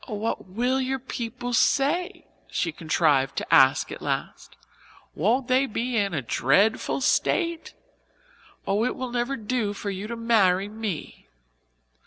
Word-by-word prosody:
"Oh, 215 - -4
what 215 0 -3
will 245 +7 0
your 265 +1 -1
people 245 -1 -5
say?" 335 - +1 0.2
she 165 - -1
contrived 155 -4 +1
to - - -3
ask 135 0 +5
at - - -7
last. - - -4 0.6
"Won't 235 - +1
they 260 +2 +3
be 240 +2 -3
in 200 -5 0
a 140 - -2
dreadful 195 - +1
state? 335 +5 0 0.9
Oh, 205 +3 +1
it 250 - -1
will 255 -1 -5
never 245 +3 -1
do 220 -1 -2
for 200 0 -5
you 195 +2 -5
to 235 - -5
marry 205 -5 +2
me." 210 - -6
225 Hz, 145 wpm, -25 LUFS, 190-255 Hz, 0.9 s, ask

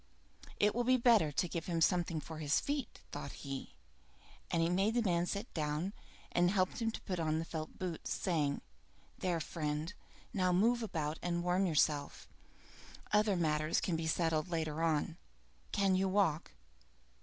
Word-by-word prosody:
"It 210 0 +4
will 240 - +1
be 255 +1 +4
better 230 -10 +5
to 160 +5 0
give 165 -1 -4
him 170 -2 0
something 170 -1 +2
for 155 +2 -8
his 150 -1 +2
feet," 285 -3 -3
thought 140 - -6
he; 135 - -5 0.7
and 170 - +1
he 165 - +3
made 195 +6 +2
the 240 - +3
man 175 -3 +1
sit 200 +5 -4
down, 155 +5 -1 0.4
and 175 0 +3
helped 185 +3 +1
him 225 - +2
to 225 - -6
put 185 -3 -3
on 155 -1 +1
the 165 - -2
felt 155 -1 -6
boots, 180 -3 -4
saying, 150 -6 0 0.6
"There, 175 -3 0
friend, 155 +1 -3 0.4
now 185 -2 +2
move 235 +6 +3
about 160 -8 -2
and 175 -1 -1
warm 180 +2 +2
yourself. 150 -3 +1 0.8
Other 210 -1 +4
matters 155 -2 +1
can 175 - -1
be 160 0 -2
settled 160 0 +1
later 160 -2 -1
on. 165 0 +1 0.5
Can 195 -2 +2
you 190 +1 +2
walk?" 185 -5 +1
170 Hz, 165 wpm, -35 LUFS, 155-195 Hz, 0.8 s, better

